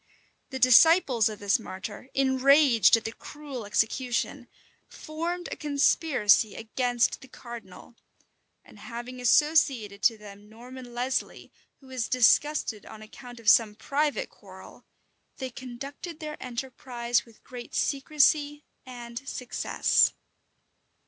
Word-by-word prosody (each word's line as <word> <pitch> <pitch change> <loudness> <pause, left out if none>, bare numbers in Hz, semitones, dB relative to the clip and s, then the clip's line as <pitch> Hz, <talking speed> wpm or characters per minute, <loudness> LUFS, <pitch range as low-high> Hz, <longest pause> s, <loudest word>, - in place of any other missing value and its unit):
The 265 - -5
disciples 255 - +5
of 215 - -7
this 205 +4 +1
martyr, 205 +4 -8
enraged 265 -3 +4
at 225 - -7
the 225 - -4
cruel 275 -3 -9
execution, 245 +4 -1 0.4
formed 335 +3 -5
a - - -3
conspiracy 280 - +2
against 240 +1 -1
the 270 - -13
cardinal; 235 -5 -12 0.7
and - - -17
having 250 +1 -8
associated 245 -7 +2
to 230 -2 +3
them 205 0 -14
Norman 250 +3 -11
Lesly, 255 +2 -3 0.3
who - - -19
was 255 -3 -4
disgusted 255 -2 +2
on 215 - -11
account 245 +2 -12
of 225 - -14
some 210 -1 +5
private 285 +6 -2
quarrel, - - -15 0.5
they 260 -2 -5
conducted 275 +7 -9
their 305 -2 -6
enterprise 245 -1 -3
with 230 -2 -22
great 245 -1 -10
secrecy 290 +1 +1 0.2
and 240 +1 -8
success. 250 -1 +1
250 Hz, 115 wpm, -27 LUFS, 230-280 Hz, 0.7 s, disciples